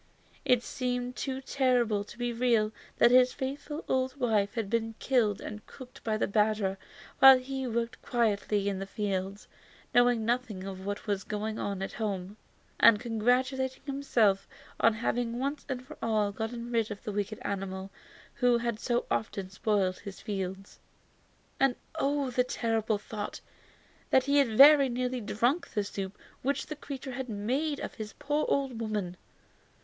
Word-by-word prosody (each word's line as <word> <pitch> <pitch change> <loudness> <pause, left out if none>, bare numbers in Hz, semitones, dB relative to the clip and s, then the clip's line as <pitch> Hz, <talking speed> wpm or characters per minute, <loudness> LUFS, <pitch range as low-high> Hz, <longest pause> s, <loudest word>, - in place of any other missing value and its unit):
It 245 -1 +3
seemed 250 -1 -3
too 265 -1 -3
terrible 245 -6 +1
to 235 - -13
be 240 0 -2
real 230 -3 +2 0.3
that 240 - +6
his 250 0 +6
faithful 290 +3 -5
old 260 +1 0
wife 215 -5 +1
had 225 -4 -1
been 225 +1 -1
killed 225 -7 +1
and 210 0 -7
cooked 255 -2 -12
by 215 -1 0
the - - +1
badger 210 -2 +1 0.4
while 270 -1 +10
he 265 0 -4
was 230 - -4
working 235 +1 -2
quietly 210 -3 0
in 195 -2 -1
the 195 - -5
fields, 195 -1 -3 0.5
knowing 245 -2 +4
nothing 235 -5 -1
of 190 0 -7
what 205 0 -4
was 200 -2 -1
going 215 +1 -3
on 195 -1 -3
at - - -5
home, 200 -3 -3 0.4
and 230 -2 +7
congratulating 255 +3 0
himself 245 -8 +1 0.3
on 230 -1 +4
having 235 +1 -1
once 280 +3 -3 0.2
for 305 +3 -10
all 215 -3 +1
got 220 +3 -3
rid 235 -2 -1
of 205 -2 -7
the 210 - -3
wicked 205 +1 -2
animal 195 -1 -4 0.4
who 245 -1 +3
had 235 -2 -2
so 240 0 0
often 195 -3 -2
spoiled 195 -2 0
his 200 -1 -9
fields. 195 -1 -5 0.8
And 270 -2 +3 0.2
oh! 280 -1 0
the 250 +1 0
horrible 225 -2 +1
thought; 210 0 -6 0.8
he 280 +2 +3
had 230 -6 +2
very 280 -1 +9
nearly 250 0 -2
drunk 240 +9 0
the 210 - +2
soup 195 -1 -5 0.2
which 280 +2 -1
the 305 - -6
creature 275 -2 -7
had 255 0 -5
made 260 +9 -1
of - - -5
his 215 -1 -7
poor 295 +1 -1
old 270 -4 0
woman. 210 -5 -2
230 Hz, 160 wpm, -30 LUFS, 205-255 Hz, 0.8 s, while